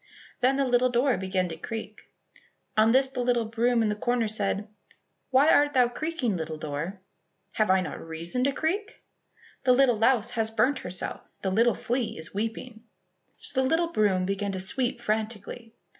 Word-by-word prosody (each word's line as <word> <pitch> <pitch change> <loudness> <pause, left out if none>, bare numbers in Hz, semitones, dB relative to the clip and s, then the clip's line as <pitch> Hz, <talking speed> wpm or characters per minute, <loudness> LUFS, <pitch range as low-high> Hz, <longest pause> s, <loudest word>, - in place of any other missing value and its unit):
Then 260 +2 +3
the 275 0 +1
little 250 0 +3
door 245 +1 +2
began 185 -1 -1
to 165 - -5
creak. 220 +3 -7 0.7
On 220 +1 +5
this 265 +2 +2
a - - -2
little 245 -2 +1
broom 230 +1 +1
in 215 - +1
the - - +1
corner 240 +1 0
said, 210 -1 -1 0.6
"Why 275 +4 +5
art 290 0 +4
thou 250 -2 +4
creaking, 260 - -2
little 160 -1 -4
door?" 155 +6 -5 0.5
"Have 215 -2 0
I 190 0 +4
not 180 - -6
reason 165 +9 -3
to 280 - +3
creak?" 375 +9 -3 0.6
"The 250 - +5
little 250 -3 +4
louse 235 0 +3
has 225 -2 0
burnt 255 +5 +1
herself, 180 0 -6
The 190 - 0
little 230 +4 +3
flea 245 -1 -2
is 160 +2 -9
weeping." 225 +2 -4 0.5
So 265 - -1
the 260 - +1
little 335 +2 +1
broom 195 - +2
began 200 +1 -2
to 190 - -3
sweep 240 +7 -1
frantically. 220 +1 -3
230 Hz, 175 wpm, -27 LUFS, 200-255 Hz, 0.7 s, On